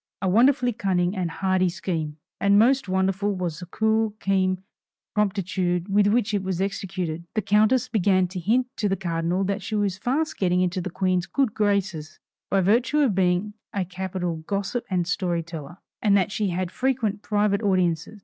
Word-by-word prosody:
A 190 - -1
wonderfully 245 +5 +4
cunning 185 -2 0
and 180 -3 -1
hardy 185 +1 +1
scheme! 170 -4 -3 0.2
And 200 0 +4
most 250 0 +3
wonderful 195 +2 0
was 175 -4 -3
the 180 - -8
cool, 220 +2 +1
keen 190 -1 +1 0.5
promptitude 185 -3 0
with 200 +1 +4
which 215 0 +1
it 200 - +1
was 185 -2 -3
executed. 185 -4 -3
The 215 - 0
countess 215 +5 +3
began 190 -5 +2
to 185 0 -5
hint 230 +8 +2
to 210 - 0
the 195 - +1
cardinal 175 0 -1
that 200 +1 -1
she 215 +3 -4
was 200 -3 0
fast 290 +8 -1
getting 180 -1 +2
into 185 0 0
the 185 - -4
Queen's 185 0 0
good 265 -3 0
graces, 200 -7 -1 0.3
by 195 0 +2
virtue 235 +10 +2
of 265 -8 +3
being 185 +2 +1 0.2
a 195 -3 -1
capital 185 -2 -3
gossip 200 +8 -3
and 180 -3 0
story 180 -2 -1
teller; 165 +1 -8 0.2
and 200 -2 +4
that 195 0 +1
she 210 -1 -1
had 180 0 -2
frequent 235 -6 -1
private 205 -1 +1
audiences. 185 -1 0
190 Hz, 180 wpm, -24 LUFS, 180-210 Hz, 0.5 s, wonderfully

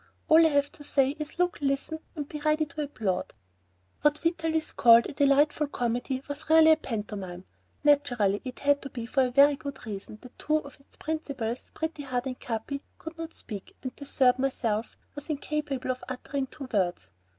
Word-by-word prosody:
All 320 +1 +8
I 320 - +6
have 285 -1 +2
to 290 - -10
say 275 -2 +2
is 300 +2 -6
look, 360 0 +1
listen, 280 +3 -1 0.2
and 295 -3 -4
be 300 - -6
ready 305 +1 +2
to 300 +1 -6
applaud." 215 - -2 0.7
What 295 0 +3
Vitalis 325 -1 0
called 230 0 +7
a - - -5
delightful 285 +2 +3
comedy 245 0 -2
was 290 +2 -7
really 320 0 +8
a - - +8
pantomime; 205 - -5 0.4
naturally 245 -9 +3
it 255 -1 -7
had 285 0 +3
to 275 - -6
be 235 -3 -5
for 265 +3 +1
the - - -1
very 280 +3 +6
good 280 -1 -7
reason 210 0 -7
that 250 - -14
two 305 +1 +2
of 285 -3 -8
its 275 - -17
principals, 275 -7 -3
Pretty 320 -1 -3
Heart 255 -2 -2
and 255 -1 -4
Capi, 240 +5 -4 0.2
could 320 +1 -8
not 330 0 -7
speak, 200 -4 -8
and 255 - -3
the 285 - -9
third, 255 -2 +3
myself, 235 -5 -1 0.2
was 290 +2 -8
incapable 295 -3 -2
of 255 0 -6
uttering 265 +1 -3
two 270 0 -8
words. 175 - 0
275 Hz, 190 wpm, -28 LUFS, 245-300 Hz, 0.7 s, All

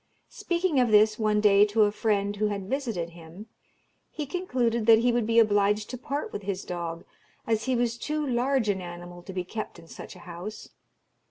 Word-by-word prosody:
Speaking 345 -4 0
of 245 -2 +3
this, 215 +1 +4
one 215 -1 +2
day, 205 -1 +6
to 210 +1 +3
a 205 - +3
friend 205 -1 0
who 215 +1 +1
had 200 -2 -4
visited 225 -10 -3
him, 170 +4 -12 0.6
he 300 - -5
concluded 250 -9 -1
that 225 -1 +8
he 240 +2 +2
would 235 -2 0
be 230 0 +1
obliged 210 -1 +3
to - - -4
part 280 +3 -4
with - - -4
his 195 -1 -4
dog, 170 -1 -5 0.4
as 220 -1 0
he 260 -1 +1
was 240 -1 0
too 305 0 -2
large 255 -1 +1
an 195 -2 0
animal 175 0 -9
to 185 - -9
be 185 -1 -3
kept 215 +3 -6
in 165 -1 -15
such - - -10
a - - -13
house. 180 +5 -8
215 Hz, 200 wpm, -27 LUFS, 190-240 Hz, 0.6 s, that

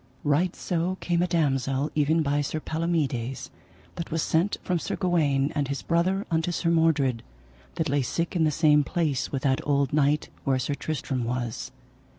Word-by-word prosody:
Right 155 +5 +1
so 175 +1 -1
came 175 -1 0
a 180 - +2
damosel 140 -4 0
even 155 +2 +2
by 145 0 +1
Sir 150 +2 -2
Palomides, 150 -7 -2 0.5
that 170 - -4
was 160 -1 -1
sent 170 +5 +1
from 180 -2 0
Sir - - -3
Gawaine 150 -6 +1
and 145 -2 0
his 140 0 -4
brother 185 +4 +1
unto 165 +1 +1
Sir 170 0 0
Mordred, 150 -8 +2 0.5
that 160 -1 -1
lay 140 0 +1
sick 165 +8 -2
in 170 - +3
the 155 - +4
same 150 -1 +4
place 155 -4 -1
with 135 -2 -3
that 135 -2 +2
old 140 -2 +1
knight 150 0 +2
where 135 -1 +2
Sir 130 +3 -1
Tristram 140 -4 -3
was. 120 -1 -3
150 Hz, 175 wpm, -26 LUFS, 140-170 Hz, 0.5 s, the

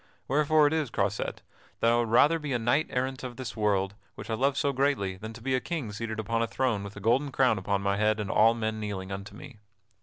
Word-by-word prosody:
Wherefore 150 +2 +4
it 145 - +2
is, 155 -5 0
Croisette, 100 -1 -2 0.4
that 115 - +3
I - - +4
would 120 -1 0
rather 150 +8 +5
be 150 -3 -3
a - - +2
knight 120 +7 +1
errant 130 0 -2
in 125 -1 -6
this 115 -5 -6
world 100 -2 +1 0.2
which - - -7
I - - +1
love 135 +4 +1
so 140 - +1
greatly 130 -9 0
than 110 +4 -8
to 115 0 -12
be 130 +1 0
a 130 - +3
king 150 -11 -4
seated 110 +1 -4
upon 115 +2 -1
a 115 - +1
throne 110 -1 -1
with 100 0 -8
a - - -7
golden 125 +7 +1
crown 125 -5 +3
upon 100 +1 -1
my 100 0 +1
head 110 +1 +2
and 105 -2 -2
all 115 +2 +5
men 110 -1 -2
kneeling 100 -3 -5
unto 100 +2 -7
me. 140 -7 -12
115 Hz, 250 wpm, -28 LUFS, 105-135 Hz, 0.4 s, rather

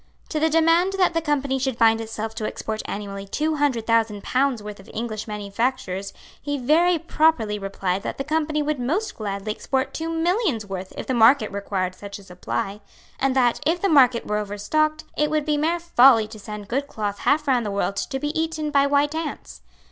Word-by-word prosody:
To 310 - -1
the 320 +1 +3
demand 330 +4 +3
that 370 -3 +2
the 330 - +1
Company 280 -3 0
should 260 -2 -1
bind 225 -1 +4
itself 220 0 -5
to 215 -1 -3
export 220 0 -4
annually 200 -1 -5
two 310 +8 -1
hundred 265 -6 +1
thousand 225 -3 +1
pounds' 255 -4 0
worth 210 -1 -8
of 195 - -15
English 220 -1 -4
manufactures 205 -1 -2 0.3
he 290 0 -2
very 330 +7 +3
properly 305 -10 +1
replied 195 -1 -2
that - - -5
the 275 - -2
Company 305 0 0
would 300 -2 -1
most 330 - -1
gladly 200 -1 -4
export 265 +5 -2
two 325 0 -3
millions' 330 - 0
worth 190 -1 -6
if - - -5
the 260 - -1
market 230 0 +5
required 195 -2 -2
such 200 +1 -9
a 200 - -14
supply, 180 - -4 0.4
and 270 -1 +1
that, 245 -3 +3
if 335 +3 +1
the 395 - +1
market 255 -6 +5
were 210 - -1
overstocked, 305 +10 -1
it 300 0 +1
would 305 -1 0
be 300 - +1
mere 320 +4 +1
folly 255 -9 +5
to 215 -1 -10
send 210 -1 -8
good 275 +5 -1
cloth 205 -5 -4
half 300 0 +1
round 250 -3 +3
the 210 - -3
world 200 0 -1
to 270 - -3
be 295 +2 -2
eaten 320 -1 -2
by 280 -1 +4
white 285 +1 +2
ants. 320 - -5
255 Hz, 200 wpm, -23 LUFS, 210-305 Hz, 0.4 s, market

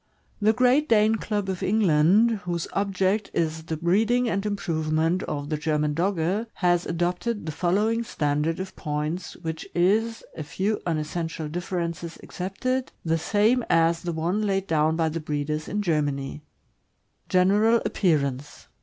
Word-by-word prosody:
The 215 +1 +5
Great 255 +6 +3
Dane 220 0 +4
Club 205 -2 -2
of 190 -1 -3
England, 205 +3 +3
whose 170 -2 -2
object 195 +1 0
is 160 -1 -1
the 160 -1 -3
breeding 220 +9 +2
and 195 -3 -1
improvement 165 -3 0
of 145 -1 -4
the 155 - -1
German 150 -1 0
Dogge, 185 +5 0
has 175 -1 +1
adopted 175 +5 -1
the 155 - -3
following 205 +8 +1
standard 150 -4 -1
of 190 0 -6
points, 155 +3 -3
which 160 -1 -5
is, 215 +6 +2
a - - -5
few 190 +8 -2
unessential 160 0 -2
differences 170 0 -4
excepted, 255 +8 -3
the 165 0 +1
same 215 +8 +2
as 165 0 +3
the 175 - -3
one 170 +6 -1
laid 195 -2 0
down 160 -2 +2
by 165 -1 +1
the 160 +1 -2
breeders 150 0 -3
in 210 0 -2
Germany: 145 -4 -1 0.9
General 205 +5 +4
appearance. 140 -6 -1
175 Hz, 145 wpm, -25 LUFS, 160-205 Hz, 0.9 s, The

